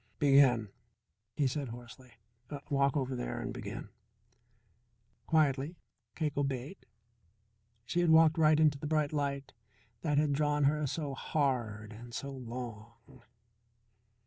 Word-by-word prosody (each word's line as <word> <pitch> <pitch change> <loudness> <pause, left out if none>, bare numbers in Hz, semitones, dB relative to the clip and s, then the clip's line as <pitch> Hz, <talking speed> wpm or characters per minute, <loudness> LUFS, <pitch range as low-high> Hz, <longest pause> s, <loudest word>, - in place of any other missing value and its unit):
"Begin," 135 -6 +4 0.7
he 145 - +1
said 135 +1 -1
hoarsely. 120 +1 -11 0.6
"Walk 140 0 +2
over 130 -1 -1
there - - -4
and - - -4
begin." - - -7 1.4
Quietly 150 0 +2 0.4
Cake 150 -4 -2
obeyed. 140 +4 -3 1.0
She 145 +10 -1
had 175 -1 +3
walked 160 0 +6
right 155 -1 +5
into 150 -3 +3
the 150 - -4
bright 155 -1 +1
light 140 -2 -2 0.5
that 150 -3 0
had 150 -1 +3
drawn 150 0 +1
her 150 +1 +2
so 145 0 -3
hard 120 -7 -1
and 120 +2 -10
so 140 -1 -4
long. 120 -3 -7
140 Hz, 120 wpm, -32 LUFS, 125-150 Hz, 1.4 s, walked